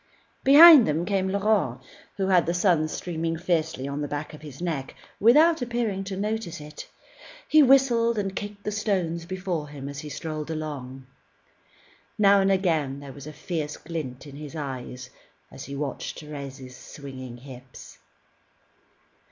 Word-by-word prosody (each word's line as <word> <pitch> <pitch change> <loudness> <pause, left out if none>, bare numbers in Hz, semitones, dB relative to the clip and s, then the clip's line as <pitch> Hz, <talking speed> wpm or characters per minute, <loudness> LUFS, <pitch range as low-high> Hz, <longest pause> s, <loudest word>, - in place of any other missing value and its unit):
Behind 295 -1 +9
them 155 +3 0
came 190 -1 0
Laurent, 200 - +1 0.4
who 195 - 0
had 180 -3 +4
the 170 - 0
sun 175 -4 +2
streaming 165 0 -3
fiercely 160 -5 -1
on 140 +1 -4
the 145 - -2
back 145 +1 -5
of 150 - -11
his 145 -3 -11
neck, 160 -7 -4 0.2
without 305 +8 +5
appearing 235 -5 -2
to 190 -1 -5
notice 210 -4 -3
it. 150 0 -10 0.6
He 310 - +6
whistled 245 -4 +4
and 195 -2 -2
kicked 205 0 -6
the 210 - -2
stones 185 -6 -1
before 180 -4 -3
him 140 -2 -8
as 140 0 -6
he 150 - -7
strolled 155 0 -5
along. 140 -5 -6 1.1
Now 200 -1 +5
and 195 0 +2
again 160 -8 0
there 140 -1 -10
was 140 +1 -11
a - - -6
fierce 155 -1 -4
glint 150 -6 -6
in 140 -1 -11
his 150 +1 -9
eyes 130 -3 -6 0.4
as 135 - -9
he 140 - -7
watched 140 -1 -4
Thérèse's 135 -3 -8
swinging 130 -3 -10
hips. 125 0 -13
160 Hz, 155 wpm, -25 LUFS, 140-195 Hz, 1.1 s, Behind